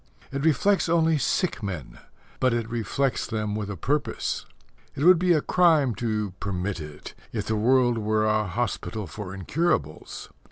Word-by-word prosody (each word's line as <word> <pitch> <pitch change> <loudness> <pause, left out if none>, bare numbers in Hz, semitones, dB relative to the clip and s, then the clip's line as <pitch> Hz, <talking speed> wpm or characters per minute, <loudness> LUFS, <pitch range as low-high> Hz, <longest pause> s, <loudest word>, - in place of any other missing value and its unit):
It 140 +1 -3
reflects 175 +4 +3
only 165 -2 +3
sick 140 - 0
men; 95 - -6 0.4
but 130 -2 +2
it 115 -1 -2
reflects 120 +3 -1
them 105 -2 -2
with 105 -1 -3
a 100 - -5
purpose. 145 - -1 0.5
It 140 - -2
would 180 0 +7
be 180 0 +2
a 155 -3 +4
crime 160 -9 +3
to 105 -4 -2
permit 95 -1 -2
it, 75 -1 -9 0.2
if 105 -3 -3
the 110 - 0
world 120 +1 +3
were 110 0 +1
a 110 -1 +2
hospital 110 +1 -3
for 90 +3 -7
incurables. 95 - -2
115 Hz, 160 wpm, -26 LUFS, 105-145 Hz, 0.5 s, would